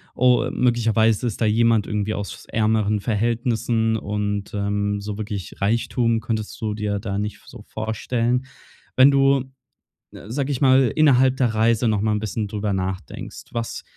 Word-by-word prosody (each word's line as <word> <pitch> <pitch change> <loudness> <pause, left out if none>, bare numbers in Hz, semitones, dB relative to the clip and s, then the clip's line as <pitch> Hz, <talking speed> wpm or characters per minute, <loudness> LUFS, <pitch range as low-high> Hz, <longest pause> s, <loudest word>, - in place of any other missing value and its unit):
„Oh, 125 0 +3
möglicherweise 115 -2 +2
ist 115 - -5
da - - +3
jemand 115 0 +3
irgendwie 105 0 -1
aus 100 -1 -6
ärmeren 110 -1 +1
Verhältnissen“, 115 +1 0
und, 105 -1 -3
ähm, 100 0 -1
so 100 0 -5
wirklich 105 -3 -6
Reichtum 115 +2 +1
könntest 110 -2 -4
du 105 -2 -2
dir 105 -1 -2
da 100 -1 -4
nicht 105 0 -4
v - - -25
so - - -11
vorstellen. 115 +3 -2 0.5
Wenn 130 +2 +7
du, 135 -1 +3 0.7
sage 130 +6 -4
ich 130 - -3
mal, 130 -3 +5
innerhalb 130 -4 +4
der 125 -4 +1
Reise 115 +2 +2
noch 105 -2 +1
mal 110 0 +1
'n - - -1
bisschen 110 0 -3
drüber 105 -1 -2
nachdenkst: 95 -5 -5
Was 115 -1 -4
110 Hz, 160 wpm, -22 LUFS, 105-120 Hz, 0.7 s, Wenn